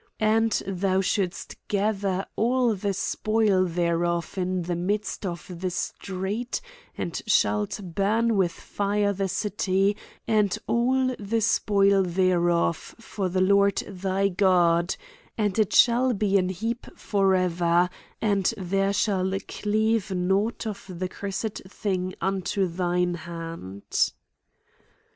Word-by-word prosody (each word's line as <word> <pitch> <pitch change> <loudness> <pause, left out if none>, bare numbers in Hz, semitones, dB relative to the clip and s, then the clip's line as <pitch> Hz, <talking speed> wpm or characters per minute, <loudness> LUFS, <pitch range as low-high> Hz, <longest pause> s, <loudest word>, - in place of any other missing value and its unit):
And 220 +1 +3
thou 190 0 0
si 195 -1 +1 0.4
gather 200 -2 0
all 245 +1 +2
the 200 0 -2
spoil 200 0 +1
thQbof 170 0 0
into 185 -2 -2
the 175 - 0
midst 200 +3 -2
of 170 -3 -5 0.2
the 185 - 0
street, 195 - -3 0.4
and 170 - -3
shalt 105 - +2
burn 210 +6 +1
with 185 -3 +2
fire 205 +3 -1
the 195 0 -1
city, 195 0 0 0.3
and 210 -3 +2
all 255 +2 +1
the 215 +2 -1
spoil 200 -2 +3
there, 180 -1 +2
of, 170 -1 +2 0.2
for 210 -4 -4
the 185 +1 0
Lord 200 +1 +4
thy 195 0 0
God; 175 -2 +3 0.4
and 210 -1 0
it 215 -1 +2
shall 245 +2 +5
be 200 -1 +1
an 180 0 0
heap 225 +6 -3
forever; 180 -3 +2 0.3
and 200 -3 +2
there 195 +1 0
shall 195 -2 +1 0.2
cleave 215 0 0
nought 190 +5 0
of 215 -2 -5
the 185 0 -4
cur 200 - -6
sed 200 +2 -3
thing 185 -2 -2
unto 190 +1 0
thine 180 0 0
hand." 165 - -3
195 Hz, 125 wpm, -26 LUFS, 180-210 Hz, 0.4 s, shall